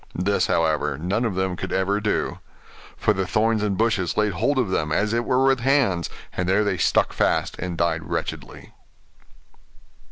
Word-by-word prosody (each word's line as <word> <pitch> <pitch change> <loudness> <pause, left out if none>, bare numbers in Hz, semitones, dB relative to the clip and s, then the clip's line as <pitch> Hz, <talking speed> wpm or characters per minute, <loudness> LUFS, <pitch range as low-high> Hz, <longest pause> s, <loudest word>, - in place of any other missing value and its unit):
This, 100 +3 +1
however, 75 -3 +1
none 95 - -1
of 105 -5 -2
them 95 -1 -1
could - - -6
ever 100 +2 +1
do; 105 - -1 0.6
for 105 - +2
the 95 -2 -2
thorns 110 +1 +1
and 100 -2 -1
bushes 110 -6 0
laid 105 -1 +2
hold 120 +10 0
of 120 -8 0
them, 75 -4 -1
as 105 +7 +1
it 120 0 0
were 130 +1 +2
with 135 -1 +3
hands; 120 - +1 0.2
and 90 0 -2
there 100 +3 +3
they 100 -3 -1
stuck - - +2
fast, - - 0
and 90 -1 -4
died 85 -1 -1
wretchedly. - - -5
100 Hz, 180 wpm, -23 LUFS, 90-115 Hz, 0.6 s, with